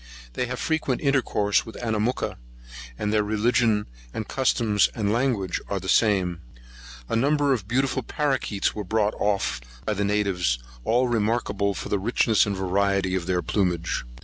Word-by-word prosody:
They 125 - -1
have 125 0 -4
frequent 160 -6 -1
intercourse 130 -7 +2
with 115 - -10
Anamooka, 115 +1 -1 0.6
and 105 0 -1
their 105 - +4
religion, 110 0 +2 0.4
customs, 110 -6 +2
and 105 -2 0
language, 115 -6 0
are - - -2
the - - -8
same. 95 -6 +2 0.7
A - - -1
number 140 +3 +3
of 105 -7 -3
beautiful 130 +3 +1
paroquets 130 -6 -1
were 105 - -4
brought 105 +1 +1
off 100 -11 0 0.2
by 110 - 0
the 100 0 -1
natives, 100 -11 +1 0.3
all 125 - +2
remarkable 105 -3 0
for - - -5
the 100 - +1
richness 110 +1 +2
and 100 -2 -2
variety 95 0 +1
of 90 -2 -2
their 90 -1 0
plumage. 90 -5 0
105 Hz, 150 wpm, -25 LUFS, 100-120 Hz, 0.7 s, their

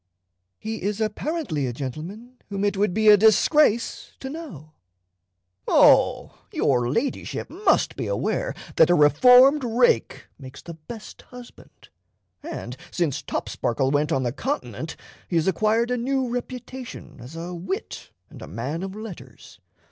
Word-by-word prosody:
"He 220 0 -5
is 205 +1 -2
apparently 220 - -2
a 120 - -3
gentleman 175 - -7
whom 200 -1 -3
it 205 - 0
would 200 0 +1
be 215 +3 +3
a 210 - +10
disgrace 230 +3 +3
to 265 - -6
know," 185 - -9 1.0
"Oh, - - +4
your 120 -3 +1
Ladyship 210 - -3
must 410 +4 +1
be - - -4
aware - - -2 0.2
that 160 - +6
a 175 - +5
reformed 250 - +6
rake 240 - +1
makes 130 -1 -11
the 170 - -8
best 210 +8 -11
husband. 250 -1 -14 0.5
And 290 - -7
since 165 -7 -1
Topsparkle 130 +3 -2
went 150 +2 +1
on 135 -4 +1
the 120 - -1
Continent 275 - -4 0.3
he 175 - -3
has 165 +1 +2
acquired 215 +6 +1
a 250 - +1
new 260 +2 -1
reputation 250 +1 -7
as 125 +6 -11
a 170 +2 -6
wit 180 +2 -5 0.2
and - - -14
a - - -8
man 125 - -4
of 195 +1 -6
letters. 175 - -11
205 Hz, 145 wpm, -24 LUFS, 150-250 Hz, 1.0 s, a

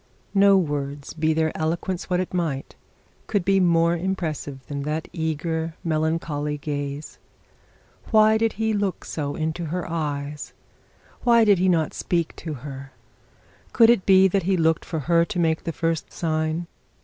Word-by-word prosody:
No 200 0 +6
words, 145 -4 -3
be 160 0 +1
their 160 0 0
eloquence 170 +4 -2
what 180 -1 +1
it 185 - -3
might, 160 -7 -2 0.5
could 200 -5 0
be 195 0 +4
more 170 -1 +3
impressive 160 -7 -3
than 140 +1 -5
that 155 +2 -3
eager, 160 0 -2
melancholy 155 -2 -1
gaze. 145 0 -5 0.9
Why 220 0 +5
did 225 0 +1
he 220 0 0
look 200 -3 -2
into 155 +3 -2
her 175 +2 -3
eyes? 150 -3 -4 0.7
Why 235 -2 +5
did 200 -4 +5
he 185 +1 +3
not 160 -4 +1
speak 170 -2 -1
to 155 -3 -5
her? 135 -1 -8 0.8
Could 230 -1 +7
it 225 -6 +1
be 190 0 +7
that 195 +1 +1
he 190 - +3
looked 160 -1 +2
for 160 -3 -3
her 170 +3 +3
to 200 +1 -5
make 160 -2 +1
the 165 - -1
first 165 -1 -2
sign? 160 0 -1
165 Hz, 155 wpm, -24 LUFS, 150-185 Hz, 0.9 s, Could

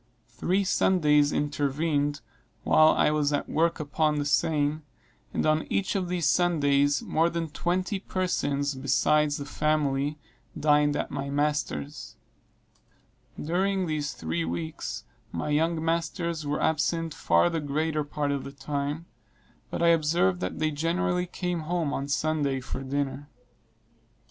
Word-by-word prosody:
Three 185 +11 0
Sundays 150 -6 +3
intervened 145 0 0 0.4
while 155 - +6
I - - +3
was 150 -1 +1
at 145 - -1
work 165 +2 +1
upon 150 +1 0
the 145 - -1
seine, 150 0 +1 0.5
and - - -1
on 155 0 +2
each 195 -1 0
of 185 -3 -1
these 175 -3 -1
Sundays 145 -4 +3
more 165 +2 +2
than 165 -2 -3
twenty 185 +5 -1
persons, 145 -7 -1
besides 145 +3 +2
the 140 - -5
family, 145 -1 0 0.4
dined 150 -1 +3
at - - -2
my 140 0 -3
master's. 145 - -2 1.2
During 190 +4 0
these 150 -3 -2
three 80 +1 -2
weeks, 80 -1 -4 0.3
my 85 - -3
young 160 +2 +1
masters 165 -1 -1
were 145 - -1
absent 165 +1 0
far 85 - +3
the 165 - -1
greater 150 +1 -1
part 145 0 -2
of 140 -1 -2
the 140 - -7
time; 145 +3 -3 0.6
but - - -2
I 170 - +6
observed 155 - +3
that 90 - -3
they 155 0 0
generally 180 +4 0
came 180 -1 -3
home 160 -2 -1
on 140 - -2
Sunday 145 -2 0
for 130 +1 -6
dinner. 140 +1 -3
150 Hz, 140 wpm, -27 LUFS, 145-165 Hz, 1.2 s, while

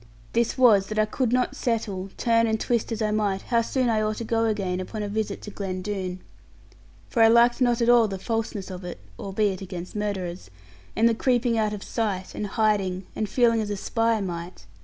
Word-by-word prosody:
This 235 +2 +1
was, 215 -7 +5
that 215 - -5
I 215 - +4
could 240 +2 -1
not 250 0 +1
settle, 205 -5 -2
turn 230 -1 +3
and 220 0 0
twist 235 0 0
as 225 -1 -1
I 215 - +1
might, 205 -2 0
how 235 -1 +2
soon 255 +2 0
I 220 -2 +2
ought 215 0 -1
to - - -4
go 225 0 +1
again 195 -5 -1
upon 210 +3 -5
a - - -2
visit 210 -1 -3
to 210 - -7
Glen 185 -2 -4
Doone. 185 -2 -4 0.9
For 235 - 0
I 225 - +8
liked 235 +2 +5
not 240 -1 +3
at - - +1
all 240 -2 +6
the 195 -2 -4
falseness 215 -2 -3
of 180 0 -7
it 180 - -7 0.2
(albeit 195 -1 -1
against 180 -1 -7
murderers), 190 - -3 0.5
the 230 +1 +4
creeping 245 0 +1
out 215 -1 +1
of 210 -1 -5
sight, 200 -5 -2
and 210 - -3
hiding, 195 -3 0
and 215 -2 -2
feeling 230 -1 +3
as 210 - -3
a 205 - -2
spy 225 +2 0
might. 175 - -6
215 Hz, 210 wpm, -25 LUFS, 195-230 Hz, 0.9 s, I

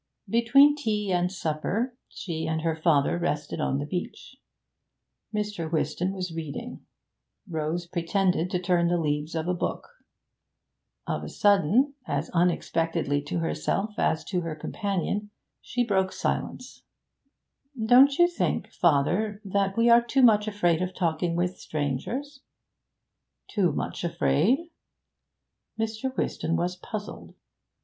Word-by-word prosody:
Between 275 +6 +5
tea 210 -8 -1
and 180 0 +1
supper 195 +8 -2
she 160 -3 -5
and 160 0 -1
her 165 -1 +1
father 160 0 +2
rested 150 -4 -2
on 135 - 0
the 145 - -3
beach. 180 - -5 1.0
Mr. 210 -6 -3
Whiston 175 +3 0
was 185 -3 -4
reading. 165 - -6 0.6
Rose 160 0 -2
pretended 180 +1 0
to 180 - 0
turn 175 -1 +2
the 175 0 +2
leaves 150 0 -1
of 160 +1 -2
a 180 - +1
book. 175 - -3 1.2
Of - - -3
a - - -6
sudden, 205 - +3
as - - -2
unexpectedly 165 -3 +1
to 170 - -2
herself 195 +5 -1
as 160 - +1
to 180 -3 -2
her 165 -2 -4
companion, 200 +4 -2 0.3
she 245 +1 -1
broke 190 -4 +1
silence. - - -3 1.0
'Don't 265 +4 +6
you 345 - +6
think, 350 - -2
father, 180 +7 +2
that 195 0 0
we 230 +1 +4
are 235 0 +7
too 255 +3 +1
much 215 -3 +5
afraid 175 -5 +1
of 185 0 -3
talking 170 -1 0
with 180 +1 -1
strangers?' 195 - -3 1.1
'Too 185 -6 +2
much - - -4
afraid?' 230 - +1 1.1
Mr. 225 +4 -2
Whiston 165 +1 -1
was 175 +2 -1
puzzled. 210 +3 -8
180 Hz, 130 wpm, -27 LUFS, 165-215 Hz, 1.2 s, are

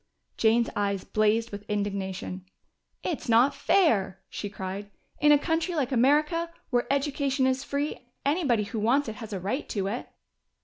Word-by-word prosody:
Jane's 230 +1 +3
eyes 200 -2 0
blazed 220 +2 +1
with 205 0 -6
indignation. 195 -2 -3 0.6
"It's 320 -8 -3
not 240 +5 +5
fair!" 205 - +2
she 205 - -4
cried. 195 +1 -6 0.3
"In 295 - +5
a 295 - +8
country 325 +3 -1
like 280 -4 0
America, 300 +7 +3 0.2
where 245 +1 +1
education 280 -1 +1
is 260 +1 +1
free. 280 -3 -3 0.2
Anybody 280 -7 +2
who 220 +2 -4
wants 250 +6 +2
it 215 - -7
has 225 -2 -8
a 195 - -3
right 205 +11 -3
to 200 -3 -1
it." 215 +5 -3
235 Hz, 160 wpm, -27 LUFS, 205-285 Hz, 0.6 s, a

